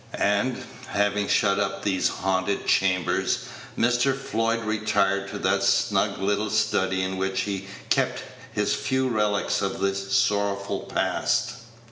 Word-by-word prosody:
And, 105 +5 0 0.2
having 100 0 0
shut 100 -1 +2
up 105 - -2
these 95 -2 +1
haunted 95 +1 -1
chambers, 90 -3 +1 0.3
Mr. 125 +3 +2
Floyd 115 -2 -1
retired 105 -2 +1
to 105 - -5
that - - +1
snug - - +2
little 105 +2 0
study 95 -3 +1
in 95 0 -3
which 95 0 -1
he 95 -1 -4 0.2
kept - - +1 0.3
his 105 0 0
few 130 +5 0
relics 105 -3 0
of 95 - -2
the 100 0 +1
sorrowful 100 0 0
past. - - 0
100 Hz, 130 wpm, -25 LUFS, 95-110 Hz, 0.3 s, shut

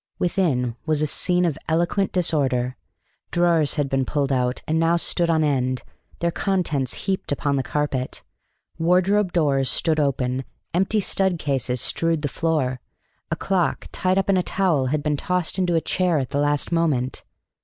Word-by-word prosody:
Within 150 - 0
was 155 -1 +1
a - - +3
scene 180 +4 +1
of 160 -3 -1
eloquent 175 +4 +1
disorder. 130 -8 +1 0.5
Drawers 170 -4 +2
had 145 -2 0
been 135 0 0
pulled 140 0 -1
out, 125 -1 0
and 160 +1 +1
now 165 +1 +3
stood 170 0 +1
on 160 -1 +3
end, 130 -3 0 0.4
their 170 0 +1
contents 160 -10 -1
heaped 190 -5 -1
upon 145 0 0
the 135 - +1
carpet. 135 -2 -2 0.6
Wardrobe 185 +3 +2
doors 140 -6 +1
stood 160 -2 +1
open; 130 -2 0 0.3
empty 195 +4 +2
stud 190 -2 +1
cases 130 -5 -1
strewed 165 -2 +1
the - - +1
floor; 145 -4 -1 0.5
a - - 0
clock, 185 -4 -1
tied 185 0 0
up 195 - +1
in 195 -1 +3
a - - +3
towel, 175 -8 +1
had 145 +2 -1
been 150 -1 0
tossed 180 +3 -1
into 180 -2 +1
a 165 - +2
chair 180 -2 +1
at 130 -3 -2
the 140 - 0
last 145 +1 +1
moment. 150 -7 0
155 Hz, 170 wpm, -23 LUFS, 135-175 Hz, 0.6 s, a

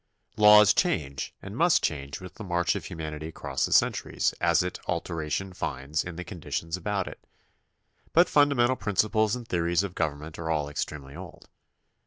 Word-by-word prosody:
Laws 105 -1 +8
change 70 -2 -1
and - - -8
must - - +3
change 70 -1 -2
with 95 -1 -10
the - - -9
march 85 -5 +1
of - - -5
humanity 80 -1 -6
across 80 - -2
the - - -9
centuries - - +2
as 85 0 +3
it 90 - -4
alteration 85 +4 -3
finds 75 -3 -3
in 85 -2 -7
the 90 - -5
conditions 85 -2 -4
about 95 +1 -2
it, - - -10 0.9
but 175 +2 +5
fundamental 140 -4 +3
principles 110 0 +1
and 120 -2 -8
theories 85 0 +1
of 95 -3 -5
government 75 -1 -3
are 80 -1 -4
all 75 -3 0
extremely 70 -1 -5
old. - - -11
85 Hz, 165 wpm, -27 LUFS, 75-100 Hz, 0.9 s, Laws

